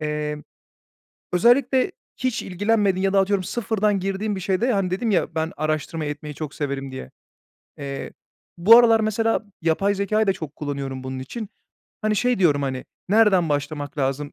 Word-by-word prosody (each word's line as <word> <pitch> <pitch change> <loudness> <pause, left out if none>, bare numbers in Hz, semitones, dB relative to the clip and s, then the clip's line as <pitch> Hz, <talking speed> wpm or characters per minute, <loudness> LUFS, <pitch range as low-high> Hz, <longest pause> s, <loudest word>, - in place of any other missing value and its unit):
Emm, 150 -1 -3 0.9
özellikle 255 - +3 0.3
hiç 255 -3 -1
ilgilenmediğin 200 0 +1
ya 195 - +1
da 195 - +5
atıyorum 195 0 +1
sıfırdan 210 -1 0
girdiğin 195 +2 -2
bir 190 - -5
şeyde, 195 +7 +1
hani, 195 -3 0
dedim 215 +5 0
ya, 170 -3 0
"Ben 160 0 -1
araştırma 155 +1 -2
etmeyi 150 0 -6
çok 150 -1 -6
severim." 135 -2 -3
diye. 130 - -8 0.7
Eee, 140 -1 -6 0.5
bu 210 +7 +8
aralar 230 -2 +5
mesela 220 +1 +1 0.2
yapay 180 +5 +2
zekâyı 215 +2 +1
da 195 - +4
çok 160 -6 -8
kullanıyorum 140 -3 -4
bunun 130 0 -5
için. 205 - -6 0.5
Hani, 215 0 +1
şey 250 +2 +1
diyorum, 150 -6 +3
hani, 130 -2 -3 0.2
"Nereden 200 -5 +4
başlamak 145 +1 -3
lazım, 140 +2 -1
185 Hz, 160 wpm, -23 LUFS, 150-215 Hz, 0.9 s, bu